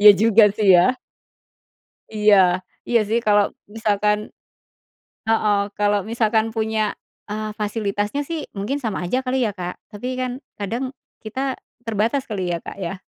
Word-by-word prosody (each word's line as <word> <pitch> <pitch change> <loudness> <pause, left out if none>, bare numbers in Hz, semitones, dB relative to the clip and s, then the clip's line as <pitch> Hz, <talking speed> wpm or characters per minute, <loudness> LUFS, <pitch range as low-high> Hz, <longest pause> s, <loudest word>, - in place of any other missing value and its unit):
Iya, 210 0 +11
juga 220 +1 +6
sih, 210 -1 +1
ya? 185 +9 +4 1.1
Iya, 210 -1 +4 0.5
iya 235 -1 +4
sih, 230 - +2
kalau 205 -1 +5 0.3
misalkan 210 -1 +1 1.1
heeh, 215 -2 +3 0.2
kalau 205 0 +3
misalkan 220 -1 +2
punya, 220 -2 0 0.3
eee, 215 +1 -3
fasilitasnya 210 +4 -1
sih, 330 +1 -4 0.2
mungkin 210 +9 -2
sama 225 -5 -2
aja 215 +9 0
kali 255 -1 +1
ya, 215 - +1
Kak? 180 0 -4 0.2
Tapi 210 +5 -5
kan, 255 -1 -1 0.3
kadang 240 +7 -3 0.3
kita 215 +5 -4 0.4
terbatas 225 +4 0
kali 190 -4 -2
ya, 170 - -2
Kak, - - -8
ya? 185 +1 -4
215 Hz, 140 wpm, -22 LUFS, 205-230 Hz, 1.1 s, Iya